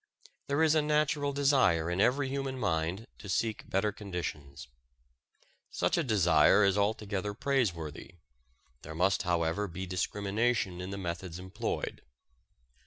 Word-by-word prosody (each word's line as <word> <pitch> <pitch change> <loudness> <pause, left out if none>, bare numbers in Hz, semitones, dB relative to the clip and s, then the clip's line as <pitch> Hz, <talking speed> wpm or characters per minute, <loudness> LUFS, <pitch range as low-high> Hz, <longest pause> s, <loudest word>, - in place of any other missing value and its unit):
There 140 +3 +2
is 155 -1 +4
a 155 - +4
natural 150 -1 +1
desire 135 - +3
in 90 +2 +1
every 135 +5 +2
human 135 0 -3
mind 85 0 -1
to 100 - -9
seek 110 +3 -1
better 100 +2 +1
conditions. 85 - -6 1.0
Such - - 0
a - - +2
desire 90 - +4
is 100 -1 +3
altogether 105 -1 -1
praiseworthy. 95 - -2 0.7
There 80 +1 -8
must, 95 +4 +2
however, 85 +2 0
be 95 +1 -6
discrimination 100 +1 -1
in 90 - -5
the 100 - -5
methods 85 -2 -5
employed. 95 +5 -4
100 Hz, 130 wpm, -30 LUFS, 90-125 Hz, 1.0 s, is